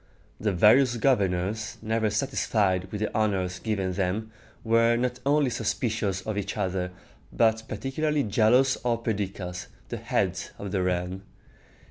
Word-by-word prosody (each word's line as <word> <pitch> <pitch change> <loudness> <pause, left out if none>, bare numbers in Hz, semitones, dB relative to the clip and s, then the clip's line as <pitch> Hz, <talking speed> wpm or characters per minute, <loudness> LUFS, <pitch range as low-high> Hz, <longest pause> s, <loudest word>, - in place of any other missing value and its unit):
The 105 - 0
various 120 +7 +5
governors, 105 -3 0
never 110 0 0
satisfied 105 -5 0
with 105 - -4
the 105 - -2
honors 95 -4 0
given 100 -4 -1
them, 100 +4 -2 0.3
were 115 +1 +4
not 125 +1 -1
only 145 -2 +3
suspicious 110 -4 -1
of 105 +1 -3
each 100 +1 -4
other, 95 -2 -1 0.4
but 110 -1 +3
particularly 140 +7 -1
jealous 120 +5 +3
of 115 -1 -1
Perdiccas, 95 -5 -3 0.2
the - - -3
head - - 0 0.2
of 100 -2 -6
the 95 - 0
realm. 90 +1 -1
110 Hz, 135 wpm, -27 LUFS, 95-115 Hz, 0.4 s, various